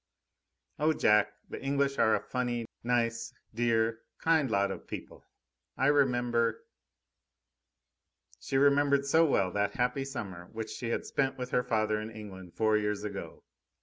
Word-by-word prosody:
"Oh, 155 Hz, +1 st, +3 dB
Jack! 105 Hz, -7 st, +3 dB, 0.2 s
The -, -, -6 dB
English 140 Hz, 0 st, 0 dB
are 110 Hz, -1 st, +5 dB
a -, -, 0 dB
funny, 120 Hz, 0 st, -2 dB, 0.2 s
nice, 115 Hz, -1 st, 0 dB, 0.2 s
dear, 115 Hz, -1 st, +1 dB, 0.2 s
kind 160 Hz, -5 st, +2 dB
lot 100 Hz, -2 st, +1 dB
of -, -, -8 dB
people. -, -, -8 dB, 0.5 s
I 135 Hz, -, +1 dB
remember 120 Hz, -5 st, +2 dB, 0.9 s
" -, -, -36 dB
She 135 Hz, -, -1 dB
remembered 140 Hz, 0 st, +4 dB
so 160 Hz, +4 st, +4 dB
well 95 Hz, -9 st, +2 dB
that 100 Hz, 0 st, -1 dB
happy 125 Hz, +2 st, 0 dB
summer 95 Hz, -10 st, -6 dB
which 110 Hz, 0 st, -5 dB
she 120 Hz, -, -4 dB
had -, -, -1 dB
spent 135 Hz, -1 st, -1 dB
with 125 Hz, 0 st, -5 dB
her -, -, +3 dB
father 110 Hz, -2 st, 0 dB
in 110 Hz, -, -6 dB
England 95 Hz, -5 st, -10 dB
four 110 Hz, -1 st, +3 dB
years 105 Hz, -1 st, -1 dB
ago. 100 Hz, -2 st, -6 dB
115 Hz, 150 wpm, -30 LUFS, 105-135 Hz, 0.9 s, are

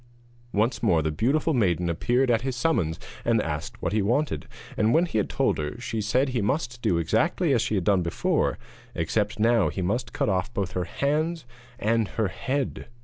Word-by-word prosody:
Once 110 Hz, +4 st, +1 dB
more 80 Hz, -2 st, +3 dB
the 80 Hz, -, 0 dB
beautiful 140 Hz, -, +1 dB
maiden 90 Hz, -, +1 dB
appeared 120 Hz, +10 st, +1 dB
at 115 Hz, -1 st, +2 dB
his 130 Hz, 0 st, -2 dB
summons 105 Hz, -, 0 dB, 0.2 s
and -, -, +2 dB
asked -, -, -4 dB
what -, -, 0 dB
he 110 Hz, -, +2 dB
wanted, 125 Hz, +9 st, 0 dB, 0.3 s
and 110 Hz, +2 st, +2 dB
when 170 Hz, +2 st, +4 dB
he 150 Hz, -11 st, -1 dB
had 105 Hz, -, -1 dB
told -, -, +1 dB
her 75 Hz, +5 st, -4 dB
she 115 Hz, -3 st, -3 dB
said 130 Hz, +6 st, +1 dB
he 125 Hz, -3 st, -1 dB
must 120 Hz, +2 st, -1 dB
do 85 Hz, -, +2 dB
exactly 130 Hz, -, +1 dB
as 120 Hz, -, +2 dB
he 110 Hz, -, -1 dB
had 95 Hz, -, 0 dB
done 95 Hz, 0 st, +3 dB
the 85 Hz, -, -1 dB
first -, -, 0 dB
time, -, -, -22 dB, 0.3 s
except 105 Hz, -1 st, 0 dB
that 105 Hz, -, 0 dB
now 115 Hz, -3 st, +4 dB
he 95 Hz, -, -3 dB
must 105 Hz, +5 st, -1 dB
cut -, -, -1 dB
off 95 Hz, +2 st, 0 dB
both 100 Hz, -5 st, -1 dB
her 90 Hz, -1 st, -2 dB
hands 155 Hz, -, -1 dB, 0.3 s
and 115 Hz, -2 st, +1 dB
her 110 Hz, -2 st, -1 dB
head. 135 Hz, +6 st, -3 dB
115 Hz, 210 wpm, -26 LUFS, 95-130 Hz, 0.3 s, when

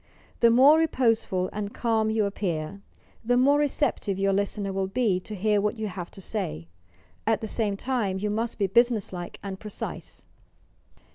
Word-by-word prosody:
The 235 Hz, -, +6 dB
more 270 Hz, +7 st, +7 dB
reposeful 225 Hz, -, +1 dB
and 210 Hz, 0 st, -4 dB
calm 225 Hz, -2 st, +1 dB
you 220 Hz, -1 st, +1 dB
appear, 185 Hz, -3 st, -3 dB, 0.4 s
the 245 Hz, +2 st, +2 dB
more 280 Hz, +3 st, +4 dB
receptive 275 Hz, -8 st, 0 dB
your 195 Hz, 0 st, +2 dB
listener 200 Hz, 0 st, -1 dB
will 190 Hz, 0 st, -1 dB
be 200 Hz, -3 st, +1 dB
to 210 Hz, +3 st, -8 dB
hear 210 Hz, +1 st, +2 dB
what 210 Hz, +3 st, -1 dB
you 215 Hz, -1 st, -3 dB
have 180 Hz, -2 st, -6 dB
to 195 Hz, -, -12 dB
say. 85 Hz, -, -4 dB, 0.6 s
At -, -, +2 dB
the 220 Hz, -, -3 dB
same 210 Hz, -2 st, -1 dB
time, 220 Hz, -6 st, -1 dB
you 205 Hz, +2 st, -2 dB
must 225 Hz, +2 st, -2 dB
be 205 Hz, -, +1 dB
business 230 Hz, 0 st, +2 dB
like 175 Hz, -1 st, -6 dB
and 195 Hz, -1 st, -5 dB
precise. 210 Hz, -2 st, -7 dB
210 Hz, 170 wpm, -26 LUFS, 195-235 Hz, 0.6 s, more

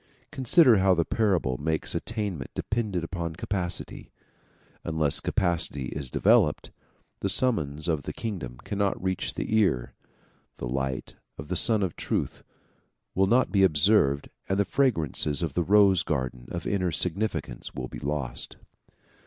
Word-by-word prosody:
Consider 130 Hz, -, +5 dB
how 95 Hz, -1 st, +4 dB
the 85 Hz, -1 st, +1 dB
parable 90 Hz, -, 0 dB
makes 80 Hz, +1 st, -1 dB
attainment 100 Hz, -, -3 dB
dependent 105 Hz, -6 st, -2 dB
upon 85 Hz, -1 st, -4 dB
capacity. 90 Hz, -1 st, -4 dB, 0.7 s
Unless 80 Hz, -2 st, +1 dB
capacity 85 Hz, -, -1 dB
is 70 Hz, -3 st, -5 dB
developed, 75 Hz, +4 st, +3 dB, 0.5 s
the 100 Hz, -, -1 dB
summons 85 Hz, -, +1 dB
of 80 Hz, -4 st, 0 dB
the -, -, -5 dB
kingdom 90 Hz, -, -5 dB
cannot 100 Hz, -1 st, -1 dB
reach 95 Hz, -1 st, -2 dB
the 110 Hz, -, -2 dB
ear, 80 Hz, -, +1 dB, 0.6 s
the -, -, -4 dB
light 65 Hz, +1 st, -3 dB, 0.2 s
of 75 Hz, -, -8 dB
the 90 Hz, -, -1 dB
Sun 110 Hz, +2 st, +4 dB
of 90 Hz, -5 st, -2 dB
Truth -, -, -3 dB, 0.7 s
will 95 Hz, +1 st, +2 dB
not 125 Hz, +5 st, +3 dB
be 100 Hz, -, +3 dB
observed 75 Hz, -4 st, +3 dB, 0.2 s
and 95 Hz, -, +1 dB
the 100 Hz, -, +2 dB
fragrances 85 Hz, -, +1 dB
of 80 Hz, -5 st, -2 dB
the 90 Hz, -, +1 dB
rose 100 Hz, 0 st, +5 dB
garden 65 Hz, -5 st, -3 dB
of 85 Hz, -, -5 dB
inner 90 Hz, -3 st, 0 dB
significance 90 Hz, -, -3 dB
will -, -, -4 dB
be -, -, -8 dB
lost. 70 Hz, -1 st, -4 dB
90 Hz, 145 wpm, -27 LUFS, 75-100 Hz, 0.7 s, Consider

